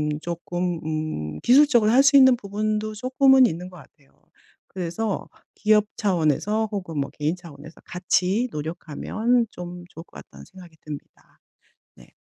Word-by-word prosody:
음 150 Hz, 0 st, -2 dB
쪼끔 175 Hz, +1 st, -4 dB
음 155 Hz, -, -4 dB
기술적으로 250 Hz, -4 st, +5 dB
할 260 Hz, +3 st, +6 dB
수 280 Hz, +1 st, +6 dB
있는 260 Hz, -2 st, +7 dB
부분도 215 Hz, 0 st, -3 dB
쪼끔은 260 Hz, +3 st, +4 dB
있는 180 Hz, -2 st, -5 dB
것 180 Hz, -, -13 dB
같아요. 140 Hz, -2 st, -20 dB, 0.6 s
그래서 190 Hz, +4 st, -4 dB, 0.3 s
기업 210 Hz, 0 st, +3 dB
차원에서 200 Hz, +3 st, 0 dB
혹은 180 Hz, -6 st, -4 dB
뭐 140 Hz, -, -2 dB
개인 150 Hz, +2 st, -2 dB
차원에서 160 Hz, -3 st, -13 dB
같이 185 Hz, +5 st, 0 dB
노력하면 175 Hz, +10 st, -2 dB
좀 175 Hz, -1 st, -9 dB
좋을 165 Hz, -, -11 dB
것 -, -, -33 dB
같다는 -, -, -13 dB
생각이 180 Hz, -3 st, -15 dB
듭니다. 150 Hz, -2 st, -11 dB, 0.6 s
네. -, -, -19 dB
180 Hz, 310 characters per minute, -23 LUFS, 160-215 Hz, 0.6 s, 있는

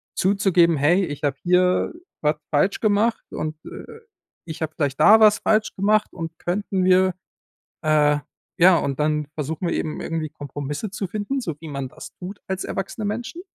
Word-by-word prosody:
zuzugeben: 185 Hz, -4 st, +3 dB
„Hey, 175 Hz, +7 st, +3 dB
ich 145 Hz, -2 st, -7 dB
habe 140 Hz, -1 st, +1 dB
hier 180 Hz, 0 st, +2 dB, 0.3 s
was 150 Hz, 0 st, +2 dB, 0.2 s
falsch 155 Hz, +7 st, +2 dB
gemacht 215 Hz, +2 st, +1 dB
und, 155 Hz, 0 st, -4 dB
äh, 450 Hz, -, -10 dB, 0.5 s
ich 160 Hz, -1 st, -8 dB
habe 155 Hz, -1 st, -2 dB
vielleicht 140 Hz, -3 st, -1 dB
da 220 Hz, +2 st, +8 dB
was 215 Hz, -1 st, +6 dB
falsch 215 Hz, 0 st, +1 dB
gemacht 210 Hz, +2 st, +1 dB
und 165 Hz, -2 st, -6 dB
könnten 190 Hz, +1 st, -1 dB
wir“ 185 Hz, 0 st, +4 dB, 0.7 s
äh, 150 Hz, -2 st, +3 dB, 0.4 s
ja, 180 Hz, +1 st, +7 dB
und 140 Hz, -1 st, -2 dB
dann 150 Hz, 0 st, 0 dB
versuchen 160 Hz, +4 st, -3 dB
wir -, -, -1 dB
eben 155 Hz, -, -3 dB
irgendwie 160 Hz, -2 st, -3 dB
Kompromisse 145 Hz, +6 st, -6 dB
zu 200 Hz, -1 st, -4 dB
finden, 215 Hz, +8 st, -3 dB
so 170 Hz, -10 st, -4 dB
wie 160 Hz, -, -8 dB
man 140 Hz, -2 st, -4 dB
das 155 Hz, +4 st, -11 dB
tut 185 Hz, +3 st, -9 dB
als 190 Hz, 0 st, -3 dB
erwachsene 195 Hz, +3 st, -4 dB
Menschen. 240 Hz, -, -5 dB
175 Hz, 170 wpm, -23 LUFS, 150-200 Hz, 0.7 s, da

